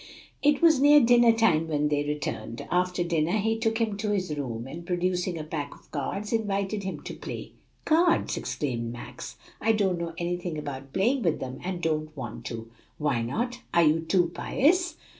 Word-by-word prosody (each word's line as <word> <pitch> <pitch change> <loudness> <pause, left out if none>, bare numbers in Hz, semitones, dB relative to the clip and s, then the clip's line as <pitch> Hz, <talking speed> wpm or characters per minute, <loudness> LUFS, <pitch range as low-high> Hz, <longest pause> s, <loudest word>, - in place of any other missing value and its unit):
It 295 +1 +3
was 320 -5 +6
near 295 +1 +8
dinner 240 -2 +6
time 185 -9 +3
when 150 -1 +1
they 145 -1 +1
returned. 145 -6 -4
After 180 0 +1
dinner 170 0 0
he 225 +2 0
took 225 0 +1
him 220 -3 0
to 210 +1 -2
his 185 -7 -1
room, 120 -5 -4
and 165 +5 -7
producing 180 0 -1
a 155 - -4
pack 150 -2 -5
of - - -22
cards, 195 - -3
invited 205 -2 0
him 190 -1 -5
to - - -6
play. - - -7 0.3
"Cards!" 330 +2 +3
exclaimed 120 -5 -3
Max. 120 0 -8 0.3
"I 225 +1 +3
don't 190 -5 +1
know 165 -1 -4
anything 175 -1 -3
about 135 -2 -6
playing 240 - +2
with 170 -6 +1
them, 130 0 -6
and 180 -1 -4
don't 155 -1 -1
want 120 -5 -6
to." 115 -1 -6 0.3
"Why 145 -6 0
not? 240 - -2
are 170 - +6
you 155 +1 +4
too 170 +1 +1
pious?" 345 +6 +2
175 Hz, 185 wpm, -27 LUFS, 150-220 Hz, 0.3 s, near